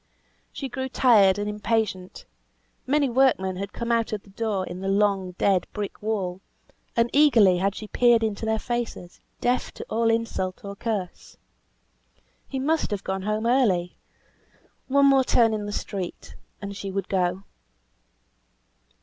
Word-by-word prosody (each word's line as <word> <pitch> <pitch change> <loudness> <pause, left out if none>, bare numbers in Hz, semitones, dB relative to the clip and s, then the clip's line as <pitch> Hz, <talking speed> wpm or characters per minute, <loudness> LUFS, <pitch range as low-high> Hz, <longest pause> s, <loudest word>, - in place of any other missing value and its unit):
She 275 - -5
grew 260 +1 -4
tired 210 -8 +5
and 205 0 -2
impatient; 210 -3 -2 0.6
many 285 +1 +2
workmen 235 -8 +2
had 200 +1 -5
come 235 0 -3
out 230 -1 +1
of 210 -2 -4
the 200 - -18
door 205 -3 -2
in 180 0 -7
the 190 - -4
long, 195 -2 +1
dead, 190 0 +1
brick 205 -2 -5
wall, 195 -4 -2 0.5
and 230 0 +3
eagerly 230 -11 +5
had 195 +1 0
she 215 - -7
peered 240 0 +3
into 215 -1 -2
their 220 0 +1
faces, 235 -7 -5 0.2
deaf 245 +1 0
to - - -8
all 230 +1 +2
insult 225 -5 -2
or 200 0 -6
curse. 200 -5 -5 1.1
He 270 - -5
must 310 +4 0
have 205 -2 -3
gone 190 0 -3
home 215 +3 -2
early; 210 -9 +2 0.9
one 280 +1 +4
more 270 -1 +5
turn 230 -3 +3
in 210 -1 -3
the - - -4
street, 195 -3 -5 0.3
and 200 0 -5
she 195 0 -5
would 195 0 -3
go. 185 0 0
210 Hz, 155 wpm, -25 LUFS, 190-235 Hz, 1.1 s, tired